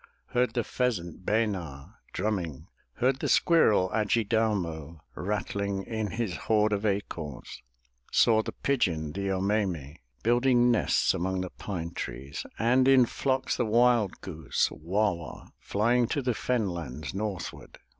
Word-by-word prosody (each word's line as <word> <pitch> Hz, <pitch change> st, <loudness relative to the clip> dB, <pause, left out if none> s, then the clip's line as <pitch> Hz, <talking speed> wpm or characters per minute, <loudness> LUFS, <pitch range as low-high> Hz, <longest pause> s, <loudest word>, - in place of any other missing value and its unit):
Heard 125 Hz, +1 st, +1 dB
the 120 Hz, -, +1 dB
pheasant, 95 Hz, -8 st, -2 dB
Be'na, 95 Hz, -11 st, -1 dB, 0.2 s
drumming. 90 Hz, -7 st, -2 dB, 0.3 s
Heard 130 Hz, +2 st, +1 dB
the -, -, -2 dB
squirrel, 110 Hz, -, +4 dB
Ad 105 Hz, -2 st, 0 dB
ji 115 Hz, -, +3 dB
dau'mo, 90 Hz, -8 st, -1 dB
Rattling 100 Hz, 0 st, -2 dB
in 110 Hz, 0 st, -3 dB
his 110 Hz, -3 st, -3 dB
hoard 105 Hz, -1 st, +2 dB
of 105 Hz, +1 st, 0 dB
acorns. 80 Hz, -11 st, -4 dB, 0.5 s
Saw 110 Hz, -1 st, +5 dB
the -, -, -5 dB
pigeon, 85 Hz, -, 0 dB
the 100 Hz, +4 st, -4 dB
0 95 Hz, -1 st, 0 dB
me'me, 90 Hz, -7 st, -1 dB, 0.2 s
Building 120 Hz, +1 st, +4 dB
nests 115 Hz, -, +2 dB
among 95 Hz, +2 st, -1 dB
the 90 Hz, -, -5 dB
pine 85 Hz, -5 st, -5 dB
trees, 70 Hz, -1 st, -6 dB
And 125 Hz, +3 st, +3 dB
in 130 Hz, -2 st, +7 dB
flocks 130 Hz, +2 st, -1 dB
the 120 Hz, -, +1 dB
wild 120 Hz, -2 st, +3 dB
goose, 80 Hz, -6 st, -1 dB
Wa'wa, 85 Hz, -, -2 dB
Flying 120 Hz, +4 st, +1 dB
to 145 Hz, +2 st, -1 dB
the 125 Hz, -1 st, +1 dB
fen 115 Hz, -1 st, 0 dB
lands 80 Hz, -5 st, -5 dB
northward. 100 Hz, -3 st, -5 dB
105 Hz, 140 wpm, -28 LUFS, 85-120 Hz, 0.5 s, in